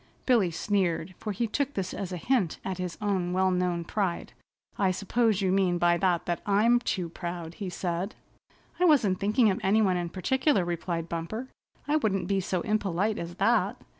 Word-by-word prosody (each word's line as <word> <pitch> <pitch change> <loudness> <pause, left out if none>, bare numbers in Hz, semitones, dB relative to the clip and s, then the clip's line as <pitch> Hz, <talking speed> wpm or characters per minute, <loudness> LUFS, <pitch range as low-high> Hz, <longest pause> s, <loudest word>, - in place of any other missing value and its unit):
Billy 230 -8 +4
sneered, 185 -1 -1
for 215 - -3
he 220 +4 -1
took 280 +5 -2
this 195 -2 -2
as 190 -2 -5
a 180 - -3
hint 205 -3 0
at 190 -1 -3
his 180 -2 -4
own 185 -4 0
well 185 0 +2
known 180 -1 0
pride. 185 0 -2 0.4
"I 195 - +2
suppose 200 +2 +1
you 185 - +2
mean 185 -2 +2
by 175 0 +3
that 175 -2 0
I'm 220 +4 +4
too 185 -7 -2
proud," 170 -1 -6
he 195 +1 -5
said. 175 +2 -3 0.6
"I 360 - +4
wasn't 230 - +4
thinking 210 +2 +3
of 190 - -2
any 200 +3 +3
one 185 -3 +2
in 175 -1 -2
particular," 260 - +1
replied 170 -1 -3
Bumper. 170 +10 -4 0.4
"I 300 +1 +3
wouldn't 195 -9 0
be 195 0 +1
so 185 -1 -1
impolite 210 0 0
as 170 +1 -6
that." - - +2
190 Hz, 185 wpm, -28 LUFS, 175-210 Hz, 0.6 s, Billy